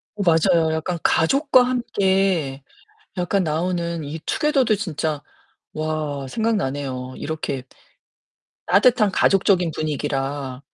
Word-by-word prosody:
어 205 Hz, -, -4 dB
맞아요 165 Hz, -1 st, +3 dB
약간 165 Hz, +2 st, -2 dB
가족과 270 Hz, -, +4 dB
함께 190 Hz, -, 0 dB, 0.5 s
약간 185 Hz, +2 st, 0 dB
나오는 170 Hz, 0 st, -2 dB
이 150 Hz, +3 st, -6 dB
투게더도 275 Hz, -7 st, +2 dB
진짜 155 Hz, -6 st, -3 dB, 0.5 s
와 155 Hz, -3 st, -3 dB
생각나네요. 135 Hz, -, -2 dB
이렇게 150 Hz, -4 st, -4 dB, 1.0 s
따뜻한 210 Hz, +1 st, +4 dB
가족적인 185 Hz, -3 st, +3 dB
분위기라. 140 Hz, -3 st, -3 dB
165 Hz, 240 characters per minute, -22 LUFS, 145-195 Hz, 1.0 s, 가족과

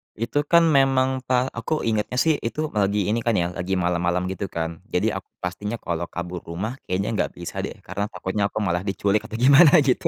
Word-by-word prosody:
Itu, 120 Hz, +6 st, -1 dB
kan, 170 Hz, +1 st, +6 dB
memang 135 Hz, -2 st, +3 dB
pa 125 Hz, 0 st, +1 dB
aku 120 Hz, +7 st, -2 dB
ingatnya, 110 Hz, +1 st, -1 dB
sih, 155 Hz, +3 st, +2 dB
itu 150 Hz, +6 st, -3 dB
lagi 100 Hz, -1 st, +1 dB
ini, 115 Hz, +3 st, +1 dB
kan, 115 Hz, -1 st, 0 dB
ya, 85 Hz, -1 st, 0 dB
lagi 90 Hz, +2 st, -2 dB
malam-malam, 90 Hz, 0 st, 0 dB
gitu, 95 Hz, +1 st, -4 dB
kan. 80 Hz, -1 st, -4 dB
Jadi 105 Hz, +4 st, 0 dB
aku 95 Hz, -2 st, -6 dB, 0.2 s
pastinya 100 Hz, +5 st, -3 dB
kalau 85 Hz, -1 st, -3 dB
kabur 90 Hz, +1 st, -5 dB
rumah 100 Hz, +10 st, -4 dB
kayaknya 95 Hz, +4 st, -1 dB
nggak -, -, 0 dB
bisa, 85 Hz, -1 st, -6 dB
deh, -, -, -4 dB
karena 100 Hz, +3 st, -3 dB
takutnya 100 Hz, -1 st, -2 dB
aku -, -, -9 dB
malah 90 Hz, -3 st, 0 dB
diculik 100 Hz, +1 st, 0 dB
apa 110 Hz, -, -7 dB
gimana, 140 Hz, +6 st, +7 dB
gitu. 130 Hz, -2 st, +1 dB
105 Hz, 205 wpm, -23 LUFS, 90-125 Hz, 0.2 s, gimana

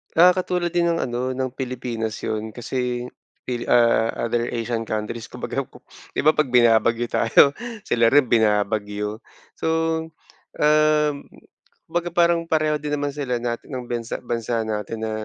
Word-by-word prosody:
Ah 180 Hz, +2 st, +6 dB
katulad 180 Hz, -1 st, 0 dB
din 170 Hz, 0 st, +1 dB
ng 165 Hz, -, -1 dB
ano 125 Hz, +1 st, -2 dB
ng 130 Hz, 0 st, -2 dB
Pilipinas 120 Hz, -4 st, -4 dB
yun. 110 Hz, 0 st, -3 dB
Kasi 125 Hz, +1 st, -3 dB, 0.4 s
pili 120 Hz, -1 st, -2 dB
ah, 115 Hz, -1 st, +4 dB, 0.2 s
other 120 Hz, +1 st, 0 dB
Asian 115 Hz, -1 st, -2 dB
countries 110 Hz, +2 st, -4 dB
kumbaga -, -, -4 dB
kop -, -, -18 dB, 0.3 s
di -, -, 0 dB
ba 155 Hz, -, +6 dB
pag 155 Hz, -1 st, +1 dB
binabagyo 115 Hz, 0 st, +4 dB
tayo 115 Hz, +5 st, +5 dB, 0.3 s
sila 115 Hz, -8 st, +2 dB
rin 145 Hz, -3 st, +5 dB
binabagyo. 105 Hz, -1 st, +1 dB, 0.4 s
So, -, -, -3 dB, 0.9 s
um, 150 Hz, 0 st, +4 dB, 0.8 s
kumbaga 175 Hz, 0 st, -2 dB
parang 170 Hz, -1 st, +3 dB
pareho 155 Hz, -2 st, +1 dB
din 150 Hz, 0 st, -5 dB
naman 145 Hz, 0 st, -1 dB
sila 125 Hz, -5 st, -2 dB
natin 120 Hz, -1 st, -3 dB
ng 130 Hz, -1 st, -4 dB
bansa, 120 Hz, -1 st, -3 dB
bansa 120 Hz, -1 st, -2 dB
natin 105 Hz, +1 st, -3 dB
na 110 Hz, -1 st, -2 dB
120 Hz, 150 wpm, -23 LUFS, 115-150 Hz, 0.9 s, Ah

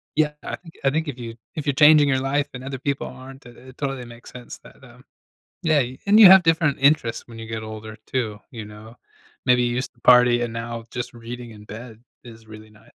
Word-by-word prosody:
yeah, 150 Hz, -1 st, +1 dB
I -, -, -4 dB
think 165 Hz, -2 st, -16 dB
I 135 Hz, -, +4 dB
think 160 Hz, +2 st, -2 dB
if 135 Hz, -, -5 dB
you 115 Hz, -1 st, -7 dB, 0.2 s
if 150 Hz, -1 st, -5 dB
you're 145 Hz, -, +1 dB
changing 150 Hz, +1 st, +6 dB
your 130 Hz, -, +2 dB
life 140 Hz, +2 st, -1 dB
and 125 Hz, 0 st, -8 dB
other 135 Hz, -1 st, -6 dB
people 140 Hz, 0 st, -3 dB
aren't, 130 Hz, +1 st, -12 dB
i -, -, -11 dB
it 130 Hz, +2 st, -16 dB
totally 135 Hz, -3 st, -4 dB
makes 120 Hz, 0 st, -13 dB
sense 125 Hz, -1 st, -10 dB
that -, -, -17 dB
that, -, -, -15 dB
um -, -, -21 dB, 0.6 s
yeah, 155 Hz, -3 st, +3 dB, 0.3 s
and 210 Hz, +2 st, +5 dB
you 210 Hz, -, +11 dB
have 190 Hz, 0 st, +9 dB
different 165 Hz, -3 st, +1 dB
interests 140 Hz, -5 st, +2 dB
when 115 Hz, -1 st, -12 dB
you 115 Hz, -, -8 dB
get 110 Hz, 0 st, -5 dB
older 110 Hz, 0 st, -9 dB
too, 110 Hz, -5 st, -3 dB
you 115 Hz, -4 st, -8 dB
know? 105 Hz, +2 st, -13 dB, 0.5 s
Maybe 125 Hz, 0 st, +4 dB
you 120 Hz, 0 st, 0 dB
used 125 Hz, -, -4 dB
to 120 Hz, -, -29 dB
party 125 Hz, -1 st, +5 dB
and 120 Hz, -1 st, -3 dB
now 115 Hz, 0 st, -6 dB
just 120 Hz, -1 st, -6 dB
reading 120 Hz, +1 st, -9 dB
in 105 Hz, -1 st, -13 dB
bed 110 Hz, +2 st, -11 dB, 0.2 s
is 115 Hz, -2 st, -14 dB
really 110 Hz, 0 st, -13 dB
ni 105 Hz, -1 st, -21 dB
125 Hz, 235 wpm, -22 LUFS, 115-140 Hz, 0.6 s, you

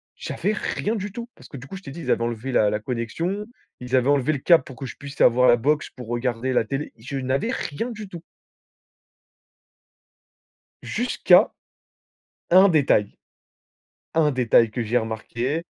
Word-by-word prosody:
J'avais 210 Hz, -, -2 dB
rien 215 Hz, +1 st, -2 dB
du 205 Hz, -1 st, -4 dB
tout, 235 Hz, +3 st, -7 dB
parce -, -, -15 dB
que 140 Hz, -, -9 dB
du 135 Hz, +2 st, -10 dB
coup, 190 Hz, -, -8 dB
je 190 Hz, -, -13 dB
t'ai 140 Hz, -, -8 dB
dit, 170 Hz, -, -8 dB
ils -, -, -6 dB
avaient 115 Hz, -, +2 dB
enlevé 120 Hz, +2 st, -3 dB
la 105 Hz, -4 st, +3 dB
la 105 Hz, -, -1 dB
connexion, 135 Hz, -, -3 dB, 0.3 s
ils 125 Hz, +1 st, -2 dB
avaient 130 Hz, +2 st, +3 dB
enlevé 145 Hz, +1 st, +2 dB
le 140 Hz, -, -3 dB
câble 165 Hz, -1 st, +5 dB
pour 130 Hz, -, -11 dB
que 135 Hz, -, -7 dB
je -, -, -8 dB
puisse 140 Hz, 0 st, -8 dB
avoir 125 Hz, +1 st, +5 dB
la 120 Hz, -, +7 dB
box 150 Hz, +5 st, 0 dB
pour 125 Hz, -3 st, -10 dB
regarder 120 Hz, +1 st, -2 dB
la 125 Hz, -, +2 dB
télé, 135 Hz, +5 st, -4 dB
je 135 Hz, +5 st, -6 dB
n'avais 135 Hz, -, -1 dB
rien 230 Hz, -, -4 dB
du 215 Hz, -2 st, -8 dB
tout 170 Hz, -2 st, -9 dB, 2.6 s
jusqu'à 245 Hz, +1 st, +3 dB, 1.0 s
un 190 Hz, +3 st, +7 dB
détail. 140 Hz, -, +2 dB, 1.0 s
Un 155 Hz, -2 st, +3 dB
détail 115 Hz, -3 st, +3 dB
que 120 Hz, +1 st, -3 dB
j'ai 115 Hz, +3 st, +1 dB
remarqué 120 Hz, +7 st, -3 dB
135 Hz, 175 wpm, -23 LUFS, 120-170 Hz, 2.6 s, la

